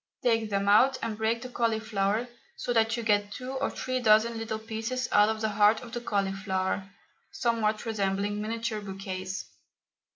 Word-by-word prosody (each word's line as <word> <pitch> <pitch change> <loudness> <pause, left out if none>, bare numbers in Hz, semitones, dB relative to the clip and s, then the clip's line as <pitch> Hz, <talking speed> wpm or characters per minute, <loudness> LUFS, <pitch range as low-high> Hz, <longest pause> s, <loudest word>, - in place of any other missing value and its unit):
Take 225 -3 +2
them 200 0 0
out 255 +6 +5
and 230 -2 -2
break 225 +2 0
the 255 - -6
cauliflower 220 -2 0 0.3
so 245 - -2
that 225 0 +2
you 235 - -3
get 205 -1 +2
two 255 +4 -6
or 270 +1 -1
three 255 0 -2
dozen 225 0 +4
little 225 -1 -3
pieces 225 +3 -3
out 210 +1 +5
of 220 0 -2
the 220 - +1
heart 210 +1 +4
of 235 -3 -11
the 240 - -3
cauliflower, 195 -2 -1 0.4
somewhat 225 -3 0
resembling 205 -1 -1
miniature 225 0 -3
bouquets. 190 -1 -5
220 Hz, 165 wpm, -28 LUFS, 205-230 Hz, 0.4 s, out